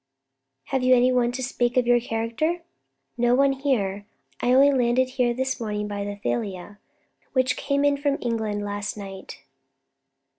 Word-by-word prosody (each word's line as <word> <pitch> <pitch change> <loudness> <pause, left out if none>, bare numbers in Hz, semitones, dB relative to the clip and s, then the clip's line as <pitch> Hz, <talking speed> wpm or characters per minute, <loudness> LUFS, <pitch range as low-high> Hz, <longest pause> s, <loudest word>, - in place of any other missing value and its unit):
"Have 265 - -2
you 255 0 +5
any 250 +1 +4
one 245 -1 +2
to 260 +1 -4
speak 245 -1 -1
to 255 - +4
your 240 0 +4
character?" 230 +10 -2 0.6
"No 240 +1 +4
one 275 +1 +4
here. 205 -8 -1 0.3
I 245 - +2
only 275 +2 +6
landed 255 0 +2 0.3
this 265 +1 -1
morning 210 -2 -3
by 205 -1 -4
the 205 0 -4
Thalia, 205 -2 -4 0.5
which 255 -1 +2
came 280 +1 0
in 285 0 +3
from 285 0 0
England 220 -3 -2
last 205 +1 -4
night." 195 -2 -9
245 Hz, 155 wpm, -24 LUFS, 210-265 Hz, 0.6 s, only